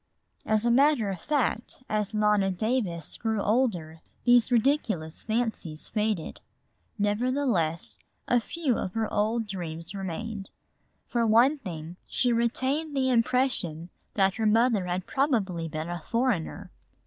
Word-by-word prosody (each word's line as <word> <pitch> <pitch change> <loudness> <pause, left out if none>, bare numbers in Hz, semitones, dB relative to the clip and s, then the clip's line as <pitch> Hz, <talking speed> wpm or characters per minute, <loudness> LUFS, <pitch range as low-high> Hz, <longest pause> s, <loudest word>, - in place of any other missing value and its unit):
As 215 +1 +2
a 235 - +4
matter 260 -5 +4
of 180 -3 -6
fact, 260 -4 -1
as 210 -1 -1
Nona 210 -2 +2
Davis 190 - -1
grew 220 -1 -1
older 195 -8 0 0.2
these 245 0 +5
ridiculous 220 - +1
fancies 220 -9 -2
faded; 210 -6 -2 0.6
nevertheless, 205 - 0 0.3
a 245 - +4
few 270 0 -1
of 185 - -4
her 225 -1 -1
old 225 +2 +1
dreams 170 -3 -6
remained. 195 +2 -5 0.6
For 235 -1 0
one 245 +7 +5
thing, 170 - -7
she 245 -1 +1
retained 260 +6 0
the 260 -1 +2
impression 230 -9 +1 0.2
that 195 -2 +3
her 220 -1 +1
mother 220 -3 +3
had 180 +1 -2
probably 205 - 0
been 155 +1 -4
a 175 -1 -4
foreigner. 230 -5 -1
215 Hz, 130 wpm, -27 LUFS, 180-245 Hz, 0.6 s, these